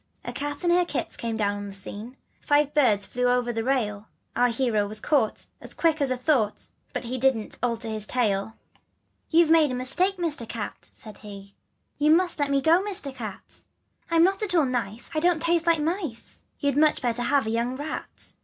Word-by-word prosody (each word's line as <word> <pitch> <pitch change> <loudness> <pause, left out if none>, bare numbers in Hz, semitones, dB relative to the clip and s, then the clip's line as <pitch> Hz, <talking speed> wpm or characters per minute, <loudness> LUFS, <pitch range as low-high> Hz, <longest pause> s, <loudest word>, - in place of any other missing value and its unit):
" - - -34
A - - -5
cat 290 +2 -4
and 345 -1 +3
her 355 0 +4
kits 350 - -3
came 230 -1 -3
down 205 -1 0
on 205 0 -6
the 195 - -8
scene, 215 +6 -8 0.2
Five 290 0 +2
birds 225 -9 +3
flew 250 +4 -2
over 245 -1 +1
the 225 0 -2
rail; 220 -5 -1 0.3
Our 245 - +4
hero 230 -4 0
was 215 +1 -3
caught 245 -4 0 0.2
As - - -8
quick 320 -2 +1
as 280 - +2
a 255 - -1
thought, 250 -6 0 0.3
And 250 0 -4
didn't 260 -5 +1
he - - -9
alter 235 -1 -2
his 215 -1 -2
tale 210 -6 +1
1 220 - -14 0.4
" - - -47
You've 330 -1 +4
made 315 -4 +5
a - - -2
mistake, 355 +10 +2
Mister 310 -9 0
Cat, 220 -3 -6
" - - -32
said 215 -2 -11
he: 200 -1 -11 0.5
"You 295 +1 +3
must 350 +1 +3
please - - +3
let - - -6
me 275 -1 +2
go, 330 +5 +4
Mister 385 -9 0
Cat. 225 -7 -9 0.5
I'm 330 0 +4
not 385 +3 +2
at 405 -4 0
all 320 -4 +4
nice, 240 -3 -3
I 310 - 0
don't 345 0 +2
taste 335 +1 +1
like 335 -2 +4
mice: 315 - -4
You'd 285 -2 0
much 305 -2 +3
better 240 0 0
have 275 +1 +2
a 220 - -2
young 235 +2 -1
rat. 295 +3 -7
255 Hz, 220 wpm, -25 LUFS, 225-310 Hz, 0.5 s, made